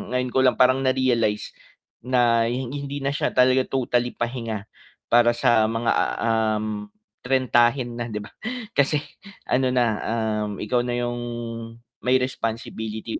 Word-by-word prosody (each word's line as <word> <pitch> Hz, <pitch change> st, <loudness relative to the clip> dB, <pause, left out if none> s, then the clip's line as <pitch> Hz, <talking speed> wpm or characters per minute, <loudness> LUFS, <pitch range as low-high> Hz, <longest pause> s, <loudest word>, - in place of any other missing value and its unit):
ngayon 125 Hz, -1 st, 0 dB
ko 130 Hz, -, +2 dB
lang 130 Hz, -1 st, +4 dB
parang 130 Hz, +1 st, +4 dB
na-realize, 130 Hz, -5 st, +1 dB, 0.5 s
na 120 Hz, -2 st, +2 dB
hi 125 Hz, +2 st, -2 dB
hindi 140 Hz, +2 st, -5 dB
na 140 Hz, -, 0 dB
siya 145 Hz, -, -2 dB
talaga 130 Hz, 0 st, +4 dB
totally 125 Hz, -2 st, 0 dB
pahinga, 115 Hz, -3 st, -3 dB, 0.5 s
para 120 Hz, 0 st, +5 dB
sa 120 Hz, -3 st, +3 dB
mga, 115 Hz, +1 st, 0 dB, 0.3 s
um, 110 Hz, -2 st, 0 dB, 0.3 s
trentahin 125 Hz, -1 st, +2 dB
na 120 Hz, -, -3 dB
'di 105 Hz, -1 st, -4 dB
ba? -, -, -12 dB, 0.4 s
kasi 145 Hz, +1 st, +2 dB, 0.4 s
ano 130 Hz, 0 st, +1 dB
na, 120 Hz, -1 st, +4 dB, 0.6 s
um, 105 Hz, -, -5 dB
ikaw 120 Hz, +4 st, 0 dB
na 120 Hz, -, -1 dB
yung, 120 Hz, 0 st, -2 dB, 0.8 s
may 125 Hz, +1 st, +2 dB
responsibility 110 Hz, -3 st, -4 dB
120 Hz, 135 wpm, -24 LUFS, 115-130 Hz, 0.8 s, para